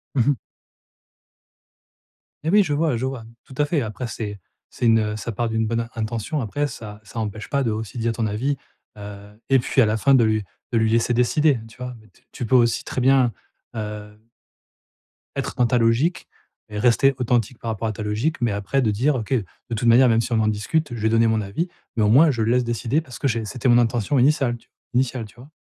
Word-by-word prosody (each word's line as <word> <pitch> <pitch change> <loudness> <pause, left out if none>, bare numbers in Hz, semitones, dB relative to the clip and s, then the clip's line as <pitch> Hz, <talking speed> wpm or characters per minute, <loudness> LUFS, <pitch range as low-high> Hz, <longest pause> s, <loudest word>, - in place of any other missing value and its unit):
Mmh 125 - +4
mh. 145 - +3 2.1
Mais 160 - -1
oui, 205 +2 +6
je 150 -6 -2
vois, 150 -5 +1
je 130 - -2
vois 130 -3 -4 0.2
tout - - -13
à 150 - +3
fait, 145 0 0
après 115 +2 -4
c'est 105 -3 -5 0.3
c'est 120 - -2
une 110 -2 +3
ça 115 +2 -4
part 115 +2 -2
d'une 110 0 0
bonne 115 +1 -1
intention. 115 +6 -2
Après 135 +6 -1
ça 105 -6 -9
ça 115 +2 -7
empêche 105 -1 -5
pas 140 -1 +1
de 115 - 0
aussi 110 +2 -5
dire 115 0 0
ton 115 0 -1
avis, 125 +7 -1 0.4
heu 105 0 -10
et 135 -1 +5
puis 130 - +2
à 115 - +5
la 110 +1 +1
fin, 135 +5 +4
de 120 - +5
lui 110 -1 +1 0.3
de 115 - +1
lui 110 -1 +2
laisser 115 +2 +2
décider, 130 +3 +3
tu 115 - -17
vois? 125 -1 -6 0.2
T - - -27
tu 120 - -5
peux 130 - +2
aussi 120 -2 +3
très 130 - -3
bien, 130 -1 +4 0.4
heu 105 -1 -6 1.2
être - - -3
dans 125 - +3
ta 125 - +2
logique 120 +10 +1 0.4
et 105 - -6
rester 125 +4 +4
authentique 120 -1 0
par 115 - -5
rapport 110 +1 -3
à - - -1
ta 105 - -6
logique, 110 +9 -1
mais 120 -2 +1
après 105 +7 -1
de 110 -4 +2
dire: 130 +8 +1
«OK, 115 -2 -5
de 110 -7 +1 0.3
toute 115 - -4
manière 125 +2 +6
même 115 0 +3
si 125 - -5
on 110 - +3
en 110 - +2
discute, 120 +8 -1
je - - -6
vais 110 - +2
donner 115 0 +4
mon 110 -1 +1
avis, 105 - -3 0.3
mais 110 - +2
au 105 - +3
moins, 150 +7 +6
je 120 -4 -2
le 110 +1 +1
laisse 125 0 +3
décider 120 +5 -1
parce 130 -6 -11
que 140 - +1
j'ai 115 -3 -1
c'était 125 +3 -1
mon 120 - +6
intention 120 +2 +1
initiale 130 -3 +2 0.4
initiale», 125 -2 0
tu 105 - -17
vois? 130 +5 -14
115 Hz, 230 wpm, -22 LUFS, 110-130 Hz, 2.1 s, oui